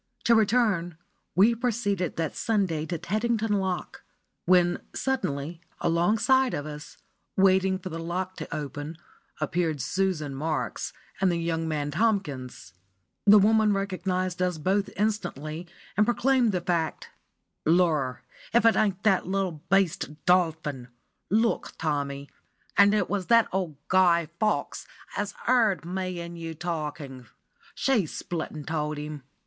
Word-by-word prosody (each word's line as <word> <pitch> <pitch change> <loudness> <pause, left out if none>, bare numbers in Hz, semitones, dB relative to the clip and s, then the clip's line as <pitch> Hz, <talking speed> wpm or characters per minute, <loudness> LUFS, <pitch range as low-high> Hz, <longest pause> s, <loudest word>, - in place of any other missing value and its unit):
To 235 - +4
return, 210 -7 +2 0.4
we 210 +6 +6
proceeded 215 -7 -1
that 165 -2 -2
Sunday 185 -9 0
to 170 +1 -2
Teddington 220 +4 0
Lock, 190 -2 -3 0.5
when 175 -1 +4
suddenly, 165 - -2 0.2
alongside 225 +10 +2
of 145 - -4
us, 150 0 -9 0.4
waiting 190 0 +4
for 185 0 -7
the 165 -1 -5
lock 180 +3 -3
to - - -7
open, 145 +2 -5 0.4
appeared 160 0 0
Susan 170 -2 -1
Marks 155 +3 -2 0.3
and 190 -2 +4
the 170 - 0
young 165 -1 -1
man 145 -2 -2
Tomkins. 155 - -1 0.5
The 210 +1 +9
woman 215 +1 +4
recognised 185 -2 -2
us 180 -2 +1
both 195 +5 0
instantly, 175 -6 -2 0.3
and 210 - +4
proclaimed 240 +1 +2
the 180 -2 -1
fact. 170 -2 -1 0.5
"Lor! 155 -6 +2 0.3
if 235 - +5
that 230 -1 +5
ain't 200 -2 +1
that 195 -5 +3
little 190 -5 -1
beast 170 -6 +1
Dolphin! 160 -8 +1 0.4
Look, 225 +3 +1
Tommy; 140 -2 -2 0.5
and 200 +1 +6
it 210 - +1
was 200 -3 -2
that 230 -1 +5
old 180 -5 -2
Guy 175 -4 +4
Fawkes 215 -1 -1 0.3
as 205 0 -3
'eard 220 -9 +3
me 185 0 -3
'n 170 0 -7
you 165 -1 -6
talking. 150 -6 -5 0.5
She 235 -11 +2
split 165 +2 -4
an' 155 -1 -7
told 150 -1 -2
him. 150 0 -6
180 Hz, 135 wpm, -27 LUFS, 155-205 Hz, 0.5 s, The